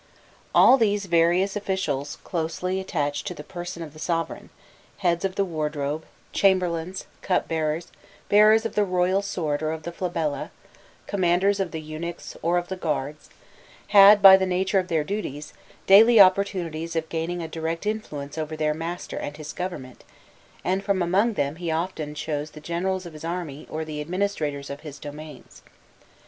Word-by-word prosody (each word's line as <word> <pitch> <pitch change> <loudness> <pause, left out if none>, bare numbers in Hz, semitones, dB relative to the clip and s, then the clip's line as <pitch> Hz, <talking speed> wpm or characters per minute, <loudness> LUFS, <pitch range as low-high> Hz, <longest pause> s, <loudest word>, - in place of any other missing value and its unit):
All 265 - +8
these 205 -3 +1
various 175 +2 +2
officials 185 -9 -2
closely 180 +2 -2
attached 145 -6 -2
to - - -4
the 150 - -9
person 175 0 -7
of 150 -3 -10
the 155 - -13
sovereign 165 0 -3 0.5
heads 175 -3 0
of 190 -1 -1
the 200 - +1
wardrobe, 150 -2 -3 0.3
chamberlains, 185 -2 +1 0.2
cupbearers, 160 -3 -1 0.4
bearers 215 +2 +5
of 225 - -3
the 210 - +2
royal 185 0 +1
sword 160 -7 -2
or 155 0 -1
of 160 -1 -5
the 170 - -5
flabella, 165 -5 -3 0.6
commanders 195 +1 +2
of 190 -2 -1
the 160 - -5
eunuchs 155 +2 -7
or 170 +2 +1
of 175 0 -2
the 190 - -4
guards 150 -4 -3 0.6
had, 205 0 +8
by 190 -1 +11
the 190 0 0
nature 190 +2 +1
of 185 - -3
their 160 -4 +1
duties, 150 -6 -5 0.3
daily 220 +4 +7
opportunities 185 -4 +3
of 160 -1 -1
gaining 170 +1 -3
a - - -4
direct 165 +2 -4
influence 160 -9 -4
over 155 0 -4
their 155 -1 +1
master 165 +3 -5
and 145 0 -5
his 155 -1 -7
government, 175 -9 -6 0.6
and 190 +2 0
from 195 -3 +1
among 200 +7 +2
them 145 -4 -2
he 175 -1 -4
often 160 -2 -3
chose 150 0 -3
the 155 - -12
generals 180 +4 -2
of 170 - -9
his 155 - -11
army 165 -4 -5
or 160 0 -4
the 150 -1 -5
administrators 155 -5 -2
of 140 - -6
his 150 -2 -9
domains. 150 -1 -10
170 Hz, 165 wpm, -25 LUFS, 155-190 Hz, 0.6 s, by